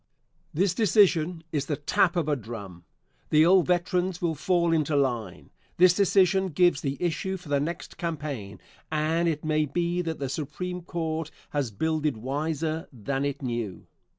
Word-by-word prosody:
This 180 +3 +1
decision 180 -5 +3
is 145 -2 -1
the 150 - 0
tap 165 +5 +2
of 170 -4 0
a 150 - +2
drum. 100 -8 -8 0.4
The 155 +1 +5
old 185 0 +5
veterans 180 0 0
will 170 -2 0
fall 170 +2 +1
into 155 -2 +1
line. 120 -9 -1 0.3
This 180 0 +7
decision 190 -1 +3
gives 175 +1 +3
the 135 -1 -2
issue 180 +2 -1
for 175 -4 -13
the 145 -1 +2
next 165 +5 -4
campaign, 145 - -4 0.3
and 160 +2 +1
it 155 -1 -3
may 155 0 +2
be 175 +4 0
that 165 -2 -3
the 140 - -3
Supreme 165 +6 -4
Court 160 -2 -3 0.2
has 145 -5 -1
builded 150 +4 -1
wiser 155 +6 -2
than 135 +3 -3
it 140 0 -3
knew. 120 -6 -4
160 Hz, 160 wpm, -27 LUFS, 140-175 Hz, 0.4 s, This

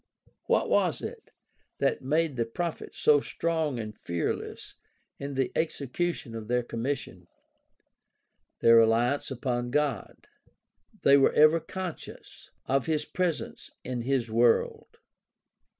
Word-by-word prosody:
What - - +2
was - - +1
it - - -7 0.5
that - - 0
made 150 +2 0
the 115 -2 0
prophets 170 +8 -5
so 150 -1 +5
strong 160 -2 -2
and 110 -1 -6
fearless 85 -4 -4 0.5
in 140 0 -5
the 135 -1 0
execution 155 -3 -2
of 110 -2 -6
their 125 +1 +1
commission? 115 -7 -4 1.3
Their 115 0 +7
reliance 115 +5 +3
upon 120 -2 -2
God. 150 +2 -2 0.8
They 140 0 +7
were 135 - +4
ever 155 +2 +6
conscious 180 +1 -8 0.2
of 135 +2 0
his 155 -2 0
presence 180 -3 -3
in 125 -1 -3
his 125 -2 -1
world. 115 +1 +1
135 Hz, 120 wpm, -28 LUFS, 120-155 Hz, 1.3 s, Their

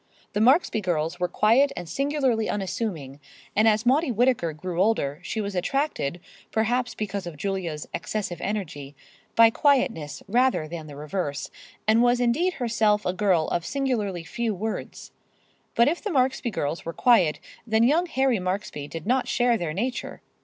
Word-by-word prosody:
The 205 - 0
Marksby 255 -1 +4
girls 170 -2 -1
were 180 - +1
quiet 235 +10 +3
and 175 - -5
singularly 270 - 0
unassuming, 180 - -3 0.4
and 215 +2 +4
as 215 +1 +3
Maudie 275 +3 +3
Whittaker 235 -7 +2
grew 175 +3 -3
older 165 -9 +1
she 200 +5 -4
was 205 -1 -3
attracted, 185 - -1 0.3
perhaps 245 +3 0
because 200 -3 -4
of 165 -3 -8
Julia's 175 -4 -3
excessive 185 -5 -3
energy, 145 -9 -4 0.4
by 230 0 +7
quietness 245 - +1
rather 245 -6 +2
than 160 -1 -7
the 145 - -10
reverse, 150 -1 -4 0.4
and 220 +2 +5
was 245 0 +3
indeed 290 +10 +2
herself 215 -3 +1
a 180 - 0
girl 185 -4 +2
of 170 - -1
singularly 215 -9 -2
few 225 +4 -2
words. 215 +4 -5 0.6
But 235 - +5
if 335 +4 0
the 425 - -2
Marksby 260 -5 +1
girls 155 -6 -3
were 165 - -5
quiet, 180 - +4 0.3
then 220 0 +3
young 315 +9 +3
Harry 265 - +1
Marksby 185 -5 -3
did 165 +2 -7
not 255 +4 +1
share 245 -1 +2
their 170 -8 -2
nature. 240 +10 -4
215 Hz, 160 wpm, -25 LUFS, 175-245 Hz, 0.6 s, by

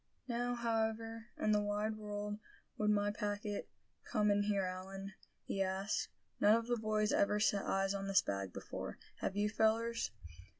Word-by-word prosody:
"Now, 245 0 0
however 225 -1 -1
in 215 - +2
the 210 0 +4
wide 210 +1 0
world 210 0 -4 0.4
would 210 -1 +1
my 205 0 +3
packet 205 0 -3 0.3
come 210 -1 +2
in 205 0 +4
here, 205 -1 +2
Allan?" 190 +1 -5 0.3
he 195 - -2
asked. 190 +2 0 0.3
"None 210 +2 +7
of 230 0 0
the 240 0 +1
boys 215 -1 +1
ever 210 +1 +3
set 205 -2 +2
eyes 195 0 +2
on 195 0 -3
this 195 0 +5
bag 100 -1 -2
before, - - -5 0.2
have 190 - -2
you, 205 +1 +3
fellers?" 225 +2 +2
210 Hz, 165 wpm, -36 LUFS, 200-220 Hz, 0.4 s, None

